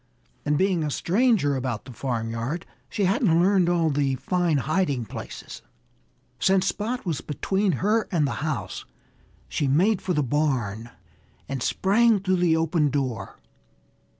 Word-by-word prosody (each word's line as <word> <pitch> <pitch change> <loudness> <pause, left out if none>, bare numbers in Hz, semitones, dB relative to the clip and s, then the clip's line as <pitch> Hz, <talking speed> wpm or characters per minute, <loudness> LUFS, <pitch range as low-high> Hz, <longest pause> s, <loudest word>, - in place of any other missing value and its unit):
And 150 0 +2
being 185 -2 +2
a 150 - -1
stranger 190 - +2
about 125 -4 -3
the 130 - -10
farmyard, 120 +5 -3 0.2
she 205 - 0
hadn't 185 -4 +3
learned 185 -1 +3
all 165 -3 +2
the 140 -1 +1
fine 175 +2 0
hiding 140 -3 0
places. - - -8 0.8
Since 190 0 +3
Spot 230 +4 -3
was 165 -6 -2
between 190 +6 0
her 210 - +1
and 165 -5 +2
the 140 - -1
house, 155 -1 -3 0.6
she 145 - -1
made 180 +9 +3
for 180 -2 -1
the 150 - +2
barn 120 -6 -1 0.6
and 135 -2 -4
sprang 215 - +3
through 185 -1 +1
the 170 -2 +3
open 160 -2 +1
door. 135 -4 -3
160 Hz, 145 wpm, -25 LUFS, 135-190 Hz, 0.8 s, hadn't